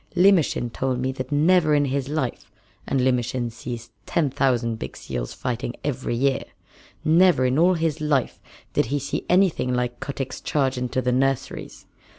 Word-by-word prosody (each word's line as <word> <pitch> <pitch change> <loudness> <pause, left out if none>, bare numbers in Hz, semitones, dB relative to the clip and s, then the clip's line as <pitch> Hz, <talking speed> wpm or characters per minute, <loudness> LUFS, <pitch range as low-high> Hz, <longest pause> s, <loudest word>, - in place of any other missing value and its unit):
Limmershin 175 -10 +3
told 130 -1 -1
me 130 +1 0
that 130 0 -6
never 155 +1 +4
in 145 -1 +3
his 135 0 -2
life 145 -5 -3 0.4
and 135 - +1
Limmershin 125 -1 0
sees 120 0 -7 0.2
ten 150 -5 +1
thousand 120 -4 +1
big - - -6
seals - - -5
fighting 120 0 -3
every 135 -4 -2
year 135 +2 +1 0.6
never 165 -3 +5
in 130 +3 +2
all 180 +2 +5
his 160 -2 -1
little 150 -2 +3
life 130 - -4 0.3
did - - +2
he 145 - 0
see 140 0 -4
anything 180 -8 +3
like 125 -1 -1
Kotick's 135 -2 -5
charge 135 -3 0
into 125 +1 -2
the 125 - +1
nurseries. 135 +1 -1
135 Hz, 165 wpm, -24 LUFS, 125-150 Hz, 0.6 s, never